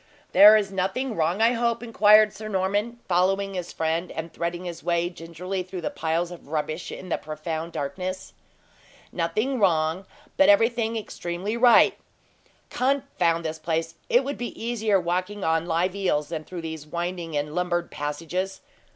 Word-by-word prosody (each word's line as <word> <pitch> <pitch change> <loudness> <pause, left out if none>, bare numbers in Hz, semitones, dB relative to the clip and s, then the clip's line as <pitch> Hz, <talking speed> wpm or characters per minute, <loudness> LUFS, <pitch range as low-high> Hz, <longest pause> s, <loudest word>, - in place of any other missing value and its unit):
"There 210 +2 +9
is 200 -2 -1
nothing 195 +7 -1
wrong, 170 +6 +1
I 230 - +5
hope?" 235 -1 0
inquired 215 -2 +5
Sir 215 +2 -8
Norman, 205 +4 -1
following 195 +2 +1
his 180 -2 -4
friend, 165 +2 -1
and 165 +1 -6
threading 175 +1 -3
his 170 -1 -7
way 175 0 0
gingerly 175 +3 -5
through 185 0 -7
the - - -3
piles 165 +2 -1
of 175 - -11
rubbish 155 +2 -3
in 185 - -8
the - - 0
profound 160 +2 -5
darkness. 185 +7 -4 0.8
"Nothing 215 +10 -1
wrong, 170 -1 +1 0.3
but 290 +1 +6
everything 230 -5 +3
extremely 190 0 -4
right. 240 0 +5 0.7
Confound 250 -12 0
this 160 0 -3
place! 165 0 -2 0.2
It 245 +3 +4
would 280 +2 -4
be 240 - -5
easier 220 -4 +1
walking 185 +3 -2
on 165 +1 +1
live 175 +2 +1
eels 150 -7 0
than 155 -2 -5
through 180 -2 -7
these 160 -2 -6
winding 170 -1 -3
and 150 +1 -2
lumbered 175 0 -1
passages. 165 +6 -4
180 Hz, 160 wpm, -25 LUFS, 165-210 Hz, 0.8 s, There